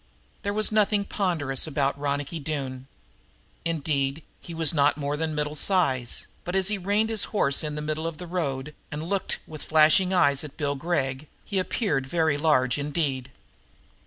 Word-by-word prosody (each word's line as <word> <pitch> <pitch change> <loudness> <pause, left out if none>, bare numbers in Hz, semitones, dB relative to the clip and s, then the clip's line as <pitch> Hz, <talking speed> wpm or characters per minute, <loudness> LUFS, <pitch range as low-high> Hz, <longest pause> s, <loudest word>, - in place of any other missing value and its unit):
There 200 - -2
was 215 +1 +3
nothing 210 -1 +2
ponderous 160 -10 +1
about 140 -2 0
Ronicky 145 +2 -3
Doone. 135 -3 -4 0.8
Indeed 150 -3 -1 0.2
he - - -11
was 165 -1 +5
not 145 -1 +3
more 145 0 -2
than 155 0 -2
middle 150 0 -2
size, 145 -8 +1 0.2
but, 180 - -4
as 190 0 +3
he 210 -2 -1
reined 205 +4 +1
his 220 -2 +2
horse 140 -10 +2
in 150 -1 -3
the 150 - -4
middle 155 +1 -2
of 165 -2 -5
the 180 - -7
road 150 -5 -3 0.2
and 150 +1 -4
looked 195 +3 -1
with 155 -1 -9
flashing 160 +5 +4
eyes 145 -6 +3
at 150 -2 -10
Bill 145 -2 0
Gregg, 140 -2 -2 0.2
he 195 - -1
appeared 185 - -1
very 160 -1 +1
large 145 -4 +2
indeed. 140 -3 -2
155 Hz, 170 wpm, -26 LUFS, 140-180 Hz, 0.8 s, was